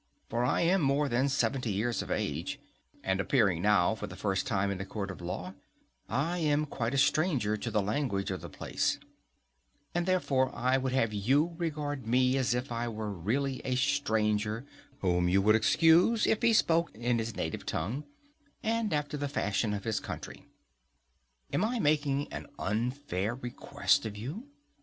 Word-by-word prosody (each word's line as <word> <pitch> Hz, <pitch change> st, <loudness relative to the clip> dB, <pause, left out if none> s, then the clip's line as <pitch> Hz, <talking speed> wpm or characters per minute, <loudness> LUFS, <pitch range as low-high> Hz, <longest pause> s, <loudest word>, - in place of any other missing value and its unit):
For 120 Hz, +1 st, +1 dB
I 125 Hz, -, +2 dB
am 180 Hz, +2 st, +3 dB
more 140 Hz, +1 st, +2 dB
than 130 Hz, +2 st, +1 dB
seventy 135 Hz, -4 st, 0 dB
years 115 Hz, +5 st, 0 dB
of -, -, -7 dB
age, -, -, -2 dB, 0.4 s
and 95 Hz, 0 st, 0 dB
appearing 100 Hz, -, +2 dB
now 105 Hz, -1 st, +4 dB
for 110 Hz, -, -5 dB
the 95 Hz, -, -9 dB
first 95 Hz, -1 st, -1 dB
time 100 Hz, +1 st, +1 dB
in 95 Hz, -1 st, -3 dB
a -, -, -2 dB
court 100 Hz, -1 st, -4 dB
of 90 Hz, -, -10 dB
law, 90 Hz, +1 st, -5 dB, 0.6 s
I 155 Hz, +9 st, 0 dB
am 150 Hz, -1 st, +2 dB
quite 125 Hz, -3 st, -2 dB
a -, -, +1 dB
stranger 135 Hz, -, +2 dB
to -, -, -4 dB
the 105 Hz, -, +1 dB
language 105 Hz, -3 st, -1 dB
of 95 Hz, -, -4 dB
the -, -, -8 dB
place; -, -, -1 dB, 1.0 s
and 175 Hz, +1 st, 0 dB
therefore 140 Hz, -8 st, +2 dB
I 130 Hz, +2 st, +2 dB
would 130 Hz, -1 st, 0 dB
have 115 Hz, -5 st, +1 dB
you 135 Hz, -, +2 dB
regard 150 Hz, -6 st, -3 dB
me 125 Hz, +2 st, +3 dB
as 130 Hz, -2 st, +1 dB
if 125 Hz, +1 st, -3 dB
I 120 Hz, 0 st, -2 dB
were 110 Hz, -2 st, -4 dB
really 125 Hz, +9 st, -1 dB
a 130 Hz, -, -1 dB
stranger, 110 Hz, -4 st, +1 dB, 0.4 s
whom 90 Hz, -1 st, +2 dB
you 95 Hz, +2 st, +4 dB
would 110 Hz, +1 st, +5 dB
excuse 165 Hz, -, +4 dB
if 220 Hz, -, +2 dB
he 235 Hz, -1 st, +4 dB
spoke 170 Hz, -6 st, +3 dB
in 120 Hz, +1 st, 0 dB
his 110 Hz, -1 st, -3 dB
native 80 Hz, -, -3 dB
tongue, 110 Hz, -, -2 dB, 0.6 s
and 225 Hz, -3 st, 0 dB
after 150 Hz, 0 st, -1 dB
the 145 Hz, 0 st, -2 dB
fashion 105 Hz, -5 st, 0 dB
of 100 Hz, -1 st, -3 dB
his 110 Hz, -2 st, 0 dB
country:—Am -, -, -8 dB
I 240 Hz, +3 st, 0 dB
making 145 Hz, -6 st, +1 dB
an -, -, -6 dB
unfair 115 Hz, -1 st, -2 dB
request 120 Hz, -2 st, 0 dB
of 105 Hz, -1 st, -7 dB
you? 155 Hz, -, -6 dB
120 Hz, 175 wpm, -30 LUFS, 105-145 Hz, 1.0 s, would